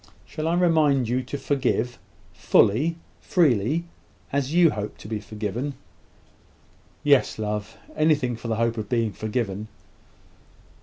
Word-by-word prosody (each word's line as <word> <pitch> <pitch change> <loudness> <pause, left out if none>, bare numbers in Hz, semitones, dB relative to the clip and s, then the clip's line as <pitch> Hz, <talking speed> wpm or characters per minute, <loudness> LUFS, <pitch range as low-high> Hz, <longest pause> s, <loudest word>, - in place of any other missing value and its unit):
Shall 155 +1 -4
I 170 - +2
remind 155 -8 +3
you 125 +2 +1
to 130 +3 -5
forgive 125 -4 -1 0.3
fully, 150 +12 +3 0.2
freely, 150 - +2 0.5
as 140 -1 0
you 170 -1 +5
hope 105 0 -5
to - - -11
be 110 -1 -3
forgiven?" 110 +6 -4 1.3
"Yes, 140 -3 +3
love; 105 +1 -4 0.2
anything 150 -6 +2
for 115 - -8
the 115 - 0
hope 115 +1 0
of 105 -1 -5
being 115 -4 0
forgiven." 110 -2 -3
125 Hz, 130 wpm, -25 LUFS, 110-145 Hz, 1.3 s, you